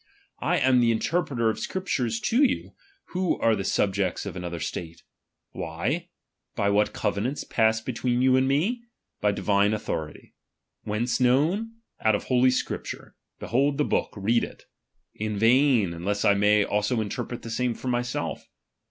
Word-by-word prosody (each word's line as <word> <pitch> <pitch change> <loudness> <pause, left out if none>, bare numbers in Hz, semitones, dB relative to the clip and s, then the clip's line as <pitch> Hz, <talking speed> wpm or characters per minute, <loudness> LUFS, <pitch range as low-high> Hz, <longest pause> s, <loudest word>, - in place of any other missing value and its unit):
I - - +1
am 130 -1 +4
the 120 -1 +4
interpreter 125 -2 0
of - - -7
Scriptures 125 -12 -2
to 250 +6 +2
yon, 270 - 0 0.4
who 185 -1 0
are 115 -1 +3
the 100 - -3
subject 95 -1 0
of - - -6
another 85 -2 -5
state. 80 +1 -6 0.5
Wliy? - - -3 0.5
By 100 0 +1
what 105 +1 +2
covenants 110 +6 -2
passed 110 -1 +1
between 125 0 -1
you 130 0 +5
and 130 0 +3
me? 180 - +1 0.4
By 105 - +2
divine 100 +1 +2
authority. 80 -7 -5 0.5
Whence 115 +4 -1
known? 155 - +2 0.3
Out 110 -1 +4
of - - -3
holy 130 0 +3
Scrip 130 - -2
ture: - - -8 0.2
behold 140 +4 +1
the 150 - +2
book, - - 0
read 115 +4 +2
it. - - -8 0.5
In 105 -1 -3
vain, 115 -4 +4
unless 100 +5 -2
I 100 - +6
may 105 +1 +3
also 105 +3 0
interpret 110 +3 -4
the 115 - -6
same 125 0 0
for - - -8
myself. 120 -1 -3
115 Hz, 160 wpm, -26 LUFS, 105-130 Hz, 0.5 s, I